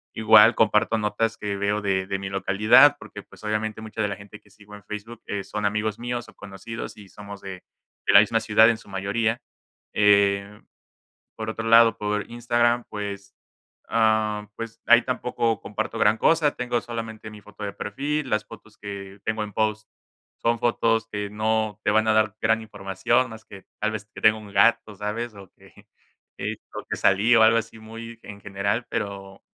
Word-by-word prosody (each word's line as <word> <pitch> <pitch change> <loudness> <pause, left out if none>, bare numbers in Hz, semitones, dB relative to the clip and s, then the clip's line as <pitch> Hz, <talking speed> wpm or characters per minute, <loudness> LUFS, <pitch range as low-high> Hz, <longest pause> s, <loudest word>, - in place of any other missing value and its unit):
igual 110 +1 +6
comparto 110 +1 +2
notas 110 +1 -1
que 105 -1 -3
veo 100 +1 0
de 95 -2 -1
de 100 -1 -2
mi 95 0 -5
localidad 105 +9 +5
porque 105 - -10
pues - - -18
obviamente 105 0 -2
mucha 110 0 -5
de 105 - +1
la 100 - -4
gente 105 +1 -13
que 105 - -25
sigo 105 0 -17
en 105 - -14
Facebook, 110 +2 -8
eh, 100 -1 -3
son 105 +1 -4
amigos 105 +1 -1
míos 120 0 -4
o - - -17
conocidos 105 +4 -8
y 100 -2 -14
somos 100 -1 -11
de 95 -2 -8 0.5
de - - +4
la 100 - +10
misma 115 +1 +1
ciudad 110 0 +5
en 115 - +1
su 110 - -18
mayoría, 105 +4 -1 0.5
eh, 100 0 +3 0.8
por 110 0 -5
otro 115 +1 -4
lado, 115 0 +6
por 105 0 -2
Instagram, 120 0 +1
pues, 100 -1 -6 0.5
ah, 110 -2 +1
pues 115 0 -7
ahí 120 0 +7
tampoco 120 -3 -1
comparto 110 +2 -4
gran 110 +1 +3
cosa, 155 0 +3
tengo 120 -1 -1
solamente 115 -2 -7
mi 105 -1 -12
foto 105 0 -14
de 100 - -4
perfil, 145 +7 -3
las 105 0 0
fotos 110 0 -15
que, 100 -1 -8
tengo 110 0 -1
en 105 - -9
post, 110 +1 -1 0.5
son 115 0 +1
fotos 115 -1 +1
que 105 -1 -3
no 110 0 -1
te 105 - +2
van 110 +1 +2
a 110 - +4
dar 110 -1 +2
gran 110 +1 +2
información 105 +4 -1
más 110 0 -11
que, 100 -1 -13 0.2
tal 110 +1 0
vez 105 -2 -6
que - - -10
tenga 110 0 +4
un 105 -2 -12
gato, 110 -2 +3
¿sabes?, 110 +3 -4
o 100 -2 -13
que, - - -20 0.9
o - - -6
que - - -1
salí, 105 +5 +4
o 110 - +6
algo 115 +1 +5
así 115 0 -6
muy 115 +1 -10
en 100 0 -10
general, 100 +4 -2
pero, 100 -3 -5
110 Hz, 190 wpm, -24 LUFS, 100-115 Hz, 0.9 s, la